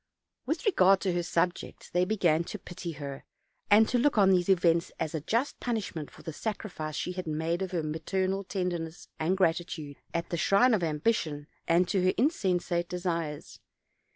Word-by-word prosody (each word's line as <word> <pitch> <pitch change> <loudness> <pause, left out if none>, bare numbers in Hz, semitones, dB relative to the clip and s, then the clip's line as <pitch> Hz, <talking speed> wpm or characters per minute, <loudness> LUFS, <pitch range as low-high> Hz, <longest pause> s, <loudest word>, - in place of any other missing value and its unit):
With - - -2
regard 195 - +5
to 185 -3 0
her 175 - 0
subjects, 175 +1 -2
they 180 +1 +2
began 175 -6 +2
to 210 - -6
pity 175 -2 -7
her, 140 -2 -7 0.5
and 215 +1 +7
to 245 - +2
look 280 -1 +2
on 195 -2 +6
these 180 0 +2
events 170 -3 +3
as 155 - -2
a 160 - -2
just 230 - -1
punishment 205 - -3
for - - -16
the 160 - -5
sacri 215 +3 -4
fice 155 -3 -5
she - - -2
had 180 -1 -5
made 160 +3 -1
of 190 - -2
her 175 -3 -2
maternal 185 +5 -1
tenderness 175 -4 -4
and 175 +4 +1
grati 175 -2 +2
tude, 145 -5 -7
at 170 0 -3
the 170 - 0
shrine 230 +9 +4
of 210 - +2
ambition 155 -2 0 0.2
and 175 +2 +4
to 190 -3 +1
her 185 - +3
insensate 180 - +1
desires. 170 -4 -3
175 Hz, 185 wpm, -29 LUFS, 165-195 Hz, 0.5 s, and